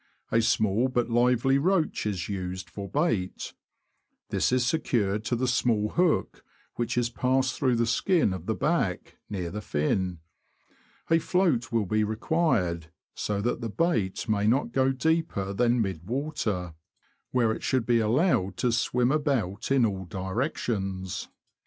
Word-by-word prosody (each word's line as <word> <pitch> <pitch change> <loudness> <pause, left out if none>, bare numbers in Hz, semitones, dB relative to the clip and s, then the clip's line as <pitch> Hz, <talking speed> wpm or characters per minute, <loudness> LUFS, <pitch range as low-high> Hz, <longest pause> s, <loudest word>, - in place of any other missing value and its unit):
A 115 - +4
small 110 +1 +2
but 120 -2 -1
lively 125 +3 +3
roach 165 - +1
is 95 -5 -2
used 95 -2 -5
for 100 -1 -6
bait; 115 - -1 0.8
this - - +1
is 125 -1 +2
secured 110 -8 0
to 120 - 0
the 130 +2 0
small 115 -4 +1
hook, 175 +3 0 0.3
which 120 +1 -2
is 120 -1 +1
passed 130 +1 +1
through 130 -3 +1
the 115 0 +2
skin 150 - +2
of 95 -2 -7
the 110 - 0
back, 150 - -1
near 90 -5 -4
the 105 - -5
fin. 90 +2 -1 0.9
A 165 - +6
float 165 -9 +1
will 115 -3 +1
be 110 +3 +1
required, 105 - 0 0.3
so 100 -1 -2
that 120 +4 -1
the 115 - -3
bait 110 - 0
may 105 -1 +1
not 130 +6 +2
go 130 0 +2
deeper 135 -9 0
than 120 +2 +2
mid 95 -2 -5
water, 115 - -2 0.6
where 120 -3 +2
it - - -4
should 130 -3 0
be 120 -1 +3
allowed 110 - +1
to 125 - +1
swim 120 +2 +1
about 135 -10 -1
in 135 -3 +4
all 95 -3 -2
directions. 95 - -3
115 Hz, 150 wpm, -27 LUFS, 100-130 Hz, 0.9 s, A